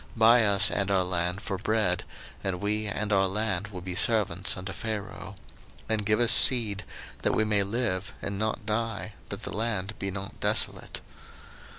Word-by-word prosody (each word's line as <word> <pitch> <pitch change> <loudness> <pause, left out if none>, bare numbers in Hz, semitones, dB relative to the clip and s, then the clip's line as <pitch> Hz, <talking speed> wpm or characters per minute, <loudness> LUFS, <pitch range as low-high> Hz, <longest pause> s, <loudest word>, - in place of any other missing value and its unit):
buy 115 +1 +6
us 100 -2 +5
and 100 -1 -1
our 95 -2 +3
land 90 +1 -2
for 95 -3 -3
bread, 105 -4 +1 0.4
and 95 -2 -2
we 105 +2 -1
and 105 +1 -2
our 95 -1 +4
land 100 -1 -2
will 95 -3 -8
be 90 0 -5
servants 95 -3 +2
unto 95 +1 -6
Pharaoh: 105 -2 -5 0.5
and 110 -1 0
give 105 +1 +3
us 120 -1 +4
seed, 110 -4 +5 0.4
that - - +1
we 110 - +2
may 105 -1 +2
live, 100 -2 -1
and 100 0 -4
not 110 +1 -2
die, 110 -1 -2 0.2
that - - -6
the - - -4
land 105 -2 -2
be 100 - -2
not 95 +1 -7
desolate. - - 0
100 Hz, 175 wpm, -28 LUFS, 95-110 Hz, 0.5 s, buy